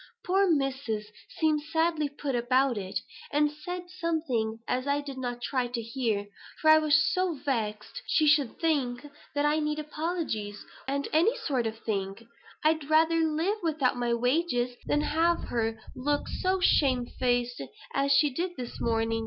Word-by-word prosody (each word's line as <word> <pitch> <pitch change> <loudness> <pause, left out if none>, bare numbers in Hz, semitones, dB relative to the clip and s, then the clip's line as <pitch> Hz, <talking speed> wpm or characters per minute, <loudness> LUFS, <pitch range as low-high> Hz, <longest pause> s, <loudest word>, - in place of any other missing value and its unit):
Poor 385 +1 +3
Missus 265 -8 -1 0.3
seemed 310 -2 +2
sadly 320 -2 +1
put 285 -1 -4
about, 255 +2 +2 0.6
and 295 0 +3
said 355 +4 -6
something 310 -11 -1
as 255 +2 -1
I 285 0 +2
did 280 -2 -7
not 245 -1 -4
try 255 -2 0
to 240 0 -3
hear; 230 -3 -1 0.3
for 310 - +6
I 315 - +8
was 305 -1 +3 0.2
so 365 -2 +1
vexed 235 - -3
she 310 - +3
should 290 -5 +3
think 280 -6 0 0.3
I 295 +1 +2
needed 300 0 -2
apologies, 300 - -3 0.2
and 280 +1 -1
them 325 +7 +5 0.2
sort 255 -6 +1
of 220 0 -5
things. 195 0 -3 0.4
I'd 310 -1 +2
rather 320 +1 +4
live 325 +6 +1
with 325 -3 0
you 265 - +4
without 240 -2 -1
wages 250 -2 +1
than 295 - +2
have 330 +3 +1
her 225 -1 -1 0.2
look 290 +3 -1
so 375 +1 0
shame 260 -8 +3
faced 245 0 -1 0.3
as 275 0 +1
she 295 +1 +5
did 355 +4 -3
this 245 -2 -6
morning. 225 0 +1
280 Hz, 160 wpm, -28 LUFS, 245-315 Hz, 0.6 s, I